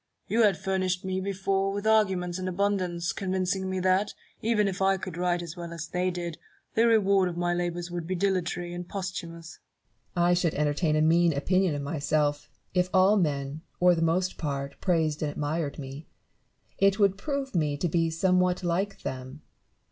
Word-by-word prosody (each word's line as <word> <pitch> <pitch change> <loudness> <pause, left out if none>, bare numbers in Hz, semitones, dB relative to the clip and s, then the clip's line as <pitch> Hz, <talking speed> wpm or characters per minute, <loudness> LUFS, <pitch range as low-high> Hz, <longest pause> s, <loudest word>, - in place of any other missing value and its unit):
You 230 - +2
had 205 -5 +4
furnished 185 -1 -1
me 190 0 -1
before 195 0 0
with 200 +1 -4
arguments 190 -5 +2
in 185 - -3
abundance, 185 -2 0
convincing 190 0 -1
me 190 0 -1
that, 185 +2 +2 0.3
even 215 -2 +2
if 195 0 -3
I 195 0 +3
could 185 -2 -6
write 175 0 0
as 170 0 -7
well 170 -1 -7
as 170 -1 -5
they 180 +2 -1
did, 175 -2 -5 0.3
the 230 +1 +4
reward 200 -4 +4
of 170 - -6
my 175 0 +1
labours 175 0 -2
would 175 -2 -4
be 185 - -1
dilatory 175 -2 -1
and 175 0 -6
posthumous. 170 -4 -6 0.6
Barrow. 175 -1 +3
I 175 - +4
should 175 -2 +1
entertain 150 +2 +1
a 155 - +3
mean 170 +1 +4
opinion 180 +3 +1
of 145 - -3
myself, 145 -1 0 0.2
if 180 0 +2
all 190 +2 +5
men 145 -5 -1 0.2
or 180 0 +6
the 165 - -1
most 180 +3 +1
part 140 -2 -4
praised 160 -5 +1
and 155 - 0
admired 145 +1 -2
me: 140 +2 -8 0.7
it 195 0 +4
would 200 -3 +3
prove 275 +5 -3
me 150 -5 0
to 175 - 0
be 165 0 +1
somewhat 180 +2 +2
like 185 +4 -1
them. 130 +3 -6
180 Hz, 185 wpm, -27 LUFS, 165-190 Hz, 0.7 s, or